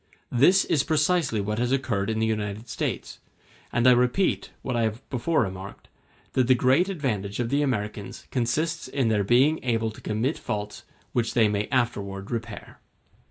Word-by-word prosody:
This 180 +11 +5
is 150 - +2
precisely 155 -5 +1
what 105 +2 -2
has 120 +1 0
occurred 115 -7 0
in 110 - -1
the 110 - +1
United 105 0 -3
States; - - -4 0.5
and 120 - +1
I - - +9
repeat, 125 +10 +2
what 125 - -2
I 120 - +1
have 110 +2 -2
before 135 +2 +1
remarked, 95 0 -7 0.4
that 130 -2 +2
the 130 - +6
great 135 +10 +3
advantage 110 - -2
of 120 -1 -1
the 140 +3 +2
Americans 105 -7 -3
consists 155 +7 -1
in 130 -5 0
their 105 -2 +2
being 130 +9 +3
able 115 -3 0
to 110 - -13
commit 115 +8 -1
faults 105 0 -5 0.3
which 115 -2 0
they 115 -3 +5
may 105 0 -1
afterward 100 -6 -2
repair. 115 -2 -6
120 Hz, 170 wpm, -26 LUFS, 105-135 Hz, 0.5 s, I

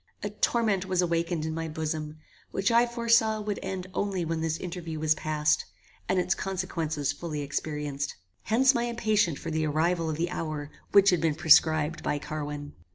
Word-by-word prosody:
A 205 - -2
torment 210 -3 +1
was 185 -1 +2
awakened 170 -1 0
in 160 - -2
my 165 0 -3
bosom, 155 -1 -4 0.3
which 195 +4 0
I 235 +1 +5
foresaw 230 -2 +2
would 210 -1 -3
end 185 -1 -4
only 195 -4 -1
when 165 0 -2
this 160 0 -1
interview 170 -3 -5
was 155 0 +3
past, 155 -1 0 0.4
and 185 - +2
its 180 +1 +2
consequences 165 -7 -2
fully 150 0 -5
experienced. 145 -1 -3 0.3
Hence 260 +4 +4
my 235 -1 0
impatience 215 -8 +1
for 165 - -5
the 155 0 0
arrival 165 +2 +1
of 155 - -2
the 170 +2 -1
hour 155 -4 -4 0.2
which 200 -1 +7
had 175 -3 +1
been 160 -3 +1
prescribed 155 0 +4
by 145 - -1
Carwin. 145 -1 -5
165 Hz, 175 wpm, -28 LUFS, 155-195 Hz, 0.4 s, which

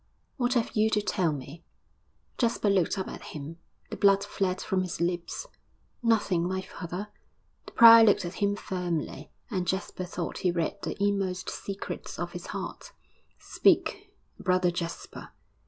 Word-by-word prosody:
'What 250 0 +1
have 235 -2 0
you 215 0 +3
to 210 -1 +1
tell 180 -6 +1
me?' 145 +4 -7 0.8
Jasper 230 -4 +2
looked 190 0 +2
up 190 - -2
at - - -8
him; 155 +2 -8 0.3
the - - -3
blood 200 0 +4
fled 190 -2 -1
from 190 -1 0
his 185 -2 -4
lips. 175 - -2 0.6
'Nothing, 205 -7 +2
my 190 +1 -1
father!' 185 +3 -6 0.6
The - - -11
prior 230 -1 +10
looked 205 -4 +4
at 175 - -5
him 200 0 +2
firmly, 175 -7 -4 0.2
and 185 -4 -1
Jasper 185 0 -2
thought 175 -1 -5
he 185 - +1
read 170 +3 -1
the - - -4
inmost 195 -2 0
secrets 200 0 -6
of - - -3
his - - -8
heart. - - -6 0.4
'Speak, - - +1 0.3
Brother 180 -1 +2
Jasper!' 170 -1 -6
185 Hz, 155 wpm, -28 LUFS, 175-205 Hz, 0.8 s, prior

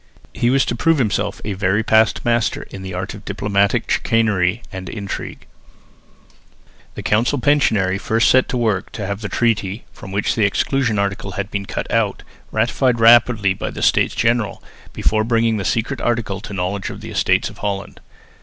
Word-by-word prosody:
He 120 - +1
was 135 +1 +3
to - - -2
prove 165 +6 +2
himself 110 -6 -1
a 105 - -2
very 95 +3 +1
past 110 0 +3
master 120 -1 +1
in 95 - -8
the 95 0 -6
art 95 +2 -4
of 105 0 -11
diplomatic 100 -1 0
chicanery 110 -2 +1
and 95 -1 -7
intrigue. 100 -3 -6 1.5
The - - -6
council 115 +7 +2
pensionary 110 -9 +2
first 110 +2 +2
set 130 0 +4
to 125 - -1
work 110 -5 0
to 105 - -4
have 100 +2 -4
the 105 - -4
treaty, 110 -3 0
from 95 - -10
which 100 +1 0
the 110 - 0
exclusion 115 +3 +1
article 100 0 -2
had 100 +2 -4
been 100 -1 -3
cut - - -4
out, - - 0 0.3
ratified 120 +2 +1
rapidly 115 -3 +5
by - - -4
the - - -6
States - - +2
General, 115 -3 0 0.3
before 110 0 +1
bringing 115 -1 +1
the 100 - -3
secret 115 +6 -1
article 115 -5 -1
to - - -8
the 100 - -7
knowledge 95 +2 -2
of - - -8
the - - -8
Estates - - +1
of - - -16
Holland. 100 -1 -4
110 Hz, 180 wpm, -19 LUFS, 100-115 Hz, 1.5 s, rapidly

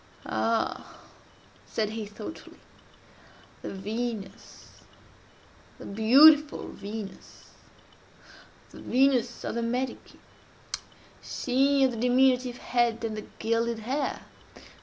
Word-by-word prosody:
"Ha!" 230 0 -1 0.7
said 215 -2 -2
he 220 -1 -5
thoughtfully, 210 +9 -10 1.0
"the - - -6
Venus—the 215 +2 -9
beautiful 285 +9 +5
Venus?—the 205 -1 -13
Venus 250 -2 +2
of - - -3
the 235 - -2
Medici?—she 260 +2 -3
of 260 - +4
the 235 - -6
diminutive 250 +1 +3
head 235 -2 0
and 220 -1 -2
the 215 - -6
gilded 230 +1 0
hair? 265 +6 -2
235 Hz, 80 wpm, -27 LUFS, 220-260 Hz, 1.0 s, beautiful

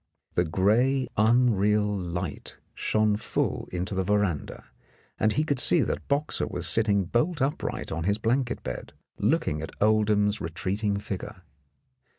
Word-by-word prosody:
The 90 - +2
grey 115 +10 +2
unreal 105 -2 +3
light 85 -3 -5 0.2
shone 110 -1 +1
full - - -2
into 90 +3 -3
the 95 0 0
veranda, 100 -5 -1 0.6
and 110 +1 +2
he 150 - +1
could 145 -4 0
see 165 +5 +4
that - - -2
Boxer 145 +2 0
was - - -2
sitting 105 -4 +2
bolt 150 - 0
upright 135 +2 -2
on 80 +1 -3
his 100 +2 +2
blanket 120 +3 -1
bed, 65 -1 -6 0.3
looking 75 0 +1
at 80 - -8
Oldham's 105 -1 +2
retreating 100 +5 -2
figure. 100 -2 -6
105 Hz, 140 wpm, -27 LUFS, 95-120 Hz, 0.6 s, see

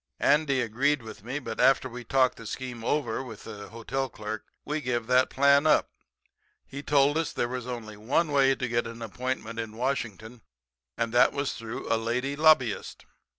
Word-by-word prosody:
"Andy 140 -2 +3
agreed 130 +4 +1
with 110 -2 -10
me, 125 +5 -4
but 115 -6 -6
after 135 -1 +4
we 125 0 -8
talked 130 +2 +2
the 115 - -9
scheme 125 -2 -6
over 125 -3 0
with 115 -5 -9
the 105 -2 -9
hotel 130 +4 -3
clerk 105 -1 -6 0.2
we 150 +1 -2
give 120 -4 -1
that 125 +2 +3
plan 140 +2 +4
up. 155 - +3 0.7
He 140 - -7
told 145 +1 +3
us 165 - -1
that - - -4
there 120 - +2
was 125 0 -5
only 110 -4 -6
one 140 +9 +1
way 135 -1 +4
to 130 - -3
get 120 0 0
an 115 0 -8
appointment 115 0 -4
in 110 -1 -5
Washington, 120 -3 -3 0.6
and 115 0 -1
that 120 - +5
was 140 -1 -1
through 115 +1 -6
a - - +3
lady 125 +5 -1
lobbyist. 150 -7 +2
125 Hz, 190 wpm, -27 LUFS, 115-140 Hz, 0.7 s, that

